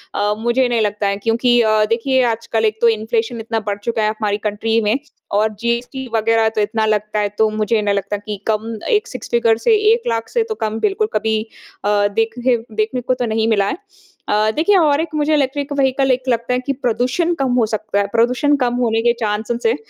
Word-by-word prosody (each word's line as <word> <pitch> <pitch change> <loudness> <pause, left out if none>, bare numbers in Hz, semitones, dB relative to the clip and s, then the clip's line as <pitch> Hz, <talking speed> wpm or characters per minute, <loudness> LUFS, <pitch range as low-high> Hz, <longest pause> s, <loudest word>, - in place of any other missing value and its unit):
अ, 205 +1 +1
मुझे 240 +3 +1
नहीं 235 -2 0
लगता 205 -1 0
है 200 0 -1
क्योंकि 235 +3 +2
अ, 215 -1 +3
देखिए 255 +3 +1
आजकल 225 0 -2
एक 215 0 0
तो 235 - +5
इन्फ़्लेशन 225 +1 -1
इतना 225 0 -2
बढ़ 200 - -1
चुका 230 -1 -1
है 215 - +2
हमारी 210 -2 -2
कंट्री 220 +2 0
में 210 +3 +1 0.4
और 215 +2 +1
जीएसटी 245 +3 -2
वगैरह 225 0 +2
तो 215 - +1
इतना 220 +1 0
लगता 215 0 0
है, 205 -1 0
तो 215 +1 +1
मुझे 215 +1 0
नहीं 205 -1 0
लगता 200 +1 -2
कि 205 0 -6
कम 220 +1 -1
एक 430 +1 +2
सिक्स - - -8
फ़िगर 230 -1 +3
से 445 - +3 0.2
1 465 - -2
लाख 230 -1 -1
से 465 -1 +1
तो 440 - -2
कम 220 +1 -3
बिल्कुल 425 +1 0
कभी 220 0 0 0.4
अ, 205 0 +3
देखने 225 +4 0 0.2
देखने 220 +4 -1
को 255 +1 0
तो 250 -1 -2
नहीं 220 0 0
मिला 200 -3 +2
है। - - -3 0.5
अ, 215 +1 +2
देखिए 335 +7 +3
और 300 -3 +3
एक 330 - -3
मुझे 305 +1 +1
इलेक्ट्रिक 285 0 0
व्हीकल 270 -1 +2
एक 255 0 0
लगता 235 +1 0
है 250 - +1
कि 275 - 0
प्रदूषण 255 +7 0
कम 265 -2 +1
हो 245 -2 +3
सकता 215 -1 -2
है, 200 - +1
प्रदूषण 250 +7 +2
कम 245 -2 0
होने 230 -2 +1
के 235 +1 +3
चांसेज़ 220 +2 -1
हैं। 230 - +2
225 Hz, 220 wpm, -18 LUFS, 215-250 Hz, 0.5 s, तो